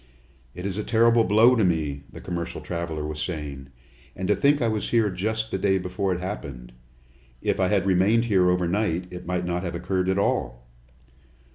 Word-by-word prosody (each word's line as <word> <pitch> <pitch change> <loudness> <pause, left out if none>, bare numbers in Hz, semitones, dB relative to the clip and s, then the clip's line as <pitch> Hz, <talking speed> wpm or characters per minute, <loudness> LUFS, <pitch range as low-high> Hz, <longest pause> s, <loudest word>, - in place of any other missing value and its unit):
"It 90 - -6
is 100 +1 -2
a - - -2
terrible 115 +1 +4
blow 115 +5 +5
to 110 - +2
me," 75 -6 -1
the - - -10
commercial 85 -1 -4
traveler 85 -3 -4
was 75 0 -4
saying. 75 -5 -5 0.5
"And 95 - -3
to 105 - +4
think 145 +1 +3
I 120 - +1
was 110 -2 -1
here 115 -4 +2
just 110 +4 -2
the 95 - -1
day 95 0 +2
before 95 +1 -2
it 90 - -1
happened! 70 - -6 0.7
If - - -1
I 95 - +3
had 100 -1 +1
remained 100 +5 +3
here 95 -5 +3
over 90 -1 +1
night, 90 -2 0
it 90 -1 -8
might 90 0 -1
not 90 0 -1
have 85 -2 -4
occurred 90 +1 -1
at 95 - +1
all!" - - -1
90 Hz, 195 wpm, -25 LUFS, 85-105 Hz, 0.7 s, blow